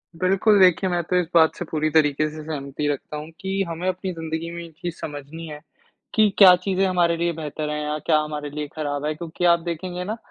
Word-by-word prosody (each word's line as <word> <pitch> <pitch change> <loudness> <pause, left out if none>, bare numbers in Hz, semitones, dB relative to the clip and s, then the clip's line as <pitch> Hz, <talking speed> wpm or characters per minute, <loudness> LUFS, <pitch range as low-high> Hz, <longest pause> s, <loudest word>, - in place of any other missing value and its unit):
बिल्कुल, 195 +4 +3
देखिए 185 0 +5
मैं 175 -1 0
तो 180 - -2
इस 180 - 0
बात 160 -1 +5
से 175 - -5
पूरी 155 -1 -1
तरीक़े 155 -1 +3
से 155 0 -9
सहमति 145 -1 -4
रखता 145 +1 -3
हूँ 155 +2 -7
कि 195 +1 -2
हमें 170 +3 -4
अपनी 185 0 -2
ज़िंदगी 160 0 -4
में 170 0 -6
ये 170 - -10
चीज़ 175 -2 -4
समझनी 150 +3 -7
है, 150 -1 -8 0.5
कि 215 -1 +5
क्या 185 -3 +9
चीज़ें 190 +1 0
हमारे 175 -2 +2
लिए 170 0 0
बेहतर 155 -1 -5
हैं 150 0 -2
या 150 0 -2
क्या 155 -2 +4
हमारे 150 -1 -4
लिए 150 0 -5
ख़राब 145 -2 -3
है, 155 - 0
क्योंकि 170 +2 -4
आप 170 -1 +5
देखेंगे 175 +2 -4
ना 215 +4 -4
165 Hz, 225 wpm, -23 LUFS, 150-180 Hz, 0.5 s, क्या